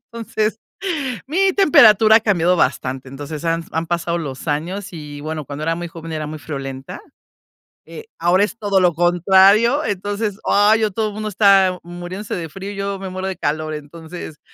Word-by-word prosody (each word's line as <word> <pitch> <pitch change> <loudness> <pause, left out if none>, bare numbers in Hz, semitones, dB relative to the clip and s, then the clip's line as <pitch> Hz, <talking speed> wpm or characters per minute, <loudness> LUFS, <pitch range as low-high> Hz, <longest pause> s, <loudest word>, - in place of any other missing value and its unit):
Entonces, 220 -1 -2 0.7
mi 380 +6 +2
temperatura 220 - +6
ha - - +5
cambiado 180 -4 +2
bastante. 130 -3 -1
Entonces, 145 +4 -7
han 165 0 0
han 165 +1 -2
pasado 170 0 -1
los 145 -1 -6
años 175 +7 -3
y, 150 -3 -8
bueno, 155 0 -5
cuando 145 +3 -7
era 165 0 0
muy 175 - -5
joven 165 -1 -9
era 155 -1 -3
muy 155 +1 -6
friolenta. 135 -3 -7 0.9
Eh, 455 0 -10
ahora 175 +4 +3
es 225 +2 -5
todo 200 -3 +1
lo 180 -2 +3
contrario. 190 - +4
Entonces, 205 +1 -3
ay, 210 +2 +4
ya 215 - +2
todo 215 +2 -2
mundo 215 +1 -4
está 195 -2 +4
muriéndose 175 +4 -6
de 165 -3 -5
frío, 195 +4 -7
y - - -9
yo 200 0 -3
me 190 -1 -6
muero 185 +1 -4
de 190 - -4
calor. 155 0 -2
Entonces, 160 +1 -9
180 Hz, 175 wpm, -19 LUFS, 160-205 Hz, 0.9 s, temperatura